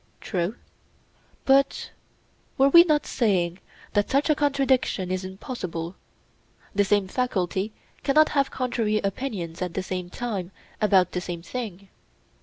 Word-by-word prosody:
True. 185 +2 -2 0.9
But 275 0 +3 0.7
were 270 +1 +5
we 340 +4 +9
not 305 -4 +2
saying 185 -7 +1 0.3
that 205 0 +2
such 280 +3 +2
a - - +3
contradiction 270 -9 +1
is 185 0 -1
impossible—the 185 - -6
same 200 -1 +2
faculty 195 -3 -1 0.3
cannot 305 +2 +4
have 280 -2 +1
contrary 235 -4 0
opinions 195 -5 -3
at 180 -2 -3
the 190 - -1
same 180 -1 -4
time 200 -5 -4 0.3
about 190 -4 +4
the 180 - -2
same 175 -2 -6
thing? 200 -4 -6
205 Hz, 125 wpm, -25 LUFS, 185-265 Hz, 0.9 s, we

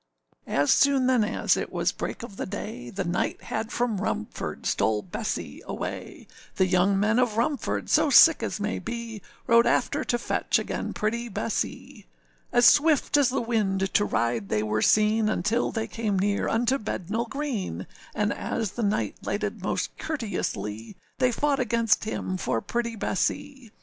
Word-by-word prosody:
â - - -6
As 145 +1 +3
soon 275 -2 +4
then 255 -3 +3
as 210 - +1
it - - -4
was - - 0
break - - -5
of 215 -4 -9
the - - -4
day, 195 - -6
The 195 0 -3
knight 175 0 -2
had 220 0 -4
from 240 -3 0
Rumford 105 - -4
stole 105 -1 +1
Bessee 90 - -4
away; - - -6 0.3
The 190 - +3
young 185 +2 +2
men 215 +4 +2
of 235 -4 +1
Rumford, 265 +5 -1
so 305 - +3
sick 315 +4 +7
as - - -3
may 210 +1 -2
be, 235 -2 -6 0.2
Rode 235 0 +5
after - - +1
to 240 - 0
fetch 240 - 0
again - - -3
pretty 235 +3 -2
Bessee. 215 - -4 0.4
As 240 - +4
swift 300 -1 +5
as 285 -3 +5
the 265 - -1
wind 195 -5 0
to 205 - +4
ride 115 - -1
they 105 0 +1
were 110 0 0
seen, 215 0 +3
Until 215 +4 0
they 225 -1 -2
came 215 -4 -2
near 200 +2 0
unto 240 +4 +1
Bednall 220 +3 -3
Green, 230 - -3 0.3
And 210 0 +1
as 220 -4 -3
the 240 - -5
knight 210 0 0
lighted - - -3
most - - -2
courteously, 115 - -4 0.2
They 255 -1 +3
fought 285 +3 0
against 230 -3 +2
him 185 -3 -3
for 115 - -1
pretty 235 - -3
Bessee. 270 +4 -2
220 Hz, 170 wpm, -26 LUFS, 195-240 Hz, 0.4 s, sick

